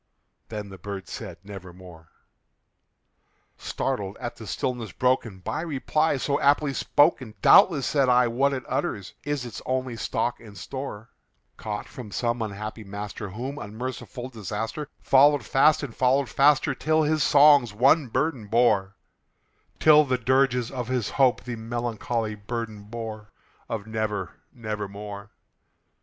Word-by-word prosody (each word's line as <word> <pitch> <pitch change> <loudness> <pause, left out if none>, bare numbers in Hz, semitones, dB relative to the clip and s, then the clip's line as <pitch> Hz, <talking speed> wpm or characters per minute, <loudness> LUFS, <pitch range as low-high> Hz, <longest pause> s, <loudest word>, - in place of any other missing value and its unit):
Then 105 -2 -6
the 95 -2 -11
bird 100 0 -6
said, - - -7
"Nevermore." 90 -4 -11 1.5
Startled 105 -7 -3
at 120 - -5
the 110 - -10
stillness 120 -2 -3
broken 125 -6 0
by 125 - -3
reply 155 -1 0
so 140 +2 0
aptly 145 0 +3
spoken, 130 -6 +2
"Doubtless," 170 -9 +6
said 140 -3 +2
I, 125 0 +5
"what 135 +4 +1
it 130 -2 -3
utters 100 -3 -3
is 145 -3 -2
its 120 - -7
only 130 -1 -2
stock 115 +2 -2
and 105 -3 -13
store, 125 +2 -7 0.5
Caught 105 -1 -5
from 120 -5 -9
some 120 +3 -1
unhappy 110 +1 -5
master 105 +1 -6
whom 130 +8 -5
unmerciful 125 +3 -6
Disaster 115 - -5
Followed 145 +2 +5
fast 155 +3 +4
and 125 -6 -6
followed 130 0 +2
faster 145 +4 +3
till 155 +3 +1
his 155 0 +1
songs 145 -5 +6
one 135 +7 +4
burden 125 -2 -1
bore 105 -4 +2 0.8
Till 150 -1 +7
the 130 -3 0
dirges 125 -1 +2
of 125 -3 -4
his 125 -3 -1
Hope 130 -3 +3
the 125 -1 -5
melancholy 115 -1 -3
burden 105 0 -6
bore 110 -2 -7 0.4
Of 105 -3 -4
'Never 110 -3 -3 0.2
nevermore.'" 105 -3 -6
120 Hz, 135 wpm, -25 LUFS, 105-135 Hz, 1.5 s, Till